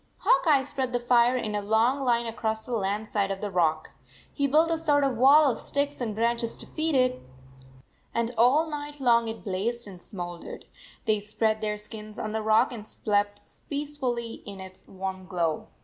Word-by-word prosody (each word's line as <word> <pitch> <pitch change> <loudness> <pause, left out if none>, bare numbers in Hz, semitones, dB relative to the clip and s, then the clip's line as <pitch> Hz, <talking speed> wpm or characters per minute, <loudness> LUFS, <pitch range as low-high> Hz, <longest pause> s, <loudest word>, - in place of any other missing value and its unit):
Hawk - - +3
Eye 285 -4 +5
spread 265 -2 -3
the 245 - +1
fire 240 +1 +4
in 220 -4 -3
a 205 - -1
long 220 +6 +2
line 240 -3 +1
across 220 -1 -3
the 250 - -5
land 205 +1 -1
side 200 -2 0
of 195 -1 -3
the 205 0 -4
rock. 160 -3 +1 0.4
He 280 -1 +1
built 315 +4 +3
a 330 - +1
sort 295 -3 +2
of 270 -2 +1
wall 275 +4 +6
of - - -5
sticks 285 -1 -2
and 220 -4 -2
branches 235 +1 0
to - - -7
feed 315 -1 -1
it, 255 -1 +2 0.9
and 235 0 -1
all 255 +8 +4
night 295 -1 -6
long 235 -3 +3
it 225 0 -6
blazed 220 +5 -2
and 185 -3 -11
smoul 175 -3 -7
dered. - - -9 0.4
They 215 -1 +2
spread 215 +1 -1
their 210 -1 -1
skins 210 0 -10
on 215 - -3
the 220 0 -2
rock 220 +2 +3
and 220 -3 -8
slept 205 -1 -1 0.3
peacefully 270 -6 -3
in 200 -3 -8
its 190 0 -11
warm 190 -1 -6
glow. 170 -4 -1
230 Hz, 195 wpm, -27 LUFS, 210-260 Hz, 0.9 s, wall